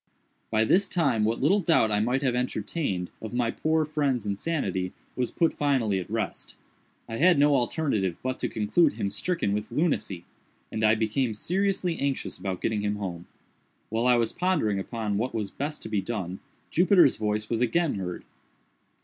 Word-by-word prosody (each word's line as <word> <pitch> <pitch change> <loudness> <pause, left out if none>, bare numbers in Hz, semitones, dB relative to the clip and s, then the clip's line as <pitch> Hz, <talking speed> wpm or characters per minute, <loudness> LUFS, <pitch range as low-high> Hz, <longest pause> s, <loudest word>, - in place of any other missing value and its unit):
By 110 0 +2
this 195 - +3
time 135 - +2
what 115 +2 0
little 190 +8 +4
doubt 160 - +3
I 105 - +2
might 125 +6 +1
have 130 -3 +2
entertained 110 - -2
of 110 +2 -6
my 120 -2 +1
poor 155 0 +1
friend's 140 -7 0
insanity, 100 - -2 0.2
was 125 -1 0
put 165 - +1
finally 125 -9 +1
at 90 - -7
rest. 110 0 -3 0.5
I 115 - -4
had 175 +4 +5
no 145 +1 +5
alternative 120 - 0
but 130 0 -2
to - - -1
conclude 110 +10 +2
him 100 -2 -2
stricken 105 - -1
with 105 +1 -3
lunacy, 120 - -1 0.5
and 110 - -2
I 110 +1 +5
became 110 +1 0
seriously 185 - 0
anxious 135 -10 -2
about 95 -1 -4
getting 110 -2 0
him 105 0 -1
home. 90 -4 -5 0.6
While 115 +3 0
I 125 - +6
was 115 -2 +1
pondering 155 - +1
upon 105 0 -2
what 125 +2 -2
was 105 -3 -2
best 150 +2 -4
to - - -6
be 105 -2 0
done, 95 -5 -4 0.3
Jupiter's 180 -4 +5
voice 105 0 -1
was 115 0 -1
again 155 +6 +2
heard. 90 -3 -5
115 Hz, 175 wpm, -27 LUFS, 105-145 Hz, 0.6 s, I